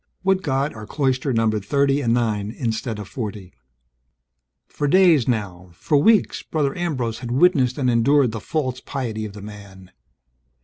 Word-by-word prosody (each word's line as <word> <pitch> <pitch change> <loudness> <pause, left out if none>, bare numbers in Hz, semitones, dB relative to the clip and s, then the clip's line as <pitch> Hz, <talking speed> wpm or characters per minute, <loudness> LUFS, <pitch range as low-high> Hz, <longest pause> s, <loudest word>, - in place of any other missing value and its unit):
Would 190 0 +2
God 140 -2 -1
our 110 -1 -9
cloister 135 0 0
numbered 110 -3 +1
thirty 140 +5 +1
and 120 -4 0
nine 110 -4 0
instead 115 -1 -3
of 105 -2 -7
forty. 105 -6 -6 1.1
For 145 - -3
days 170 -5 +4
now, 95 -7 -3
for 145 - -1
weeks, 210 +9 +3
Brother 145 -4 -2
Ambrose 130 -11 -2
had 120 -1 -7
witnessed 130 -2 +3
and 135 -3 0
endured 125 +2 +3
the 110 - -5
false 130 0 -3
piety 115 -6 -4
of 105 - -8
the 105 -1 -10
man. 100 -3 -12
125 Hz, 160 wpm, -22 LUFS, 110-140 Hz, 1.1 s, days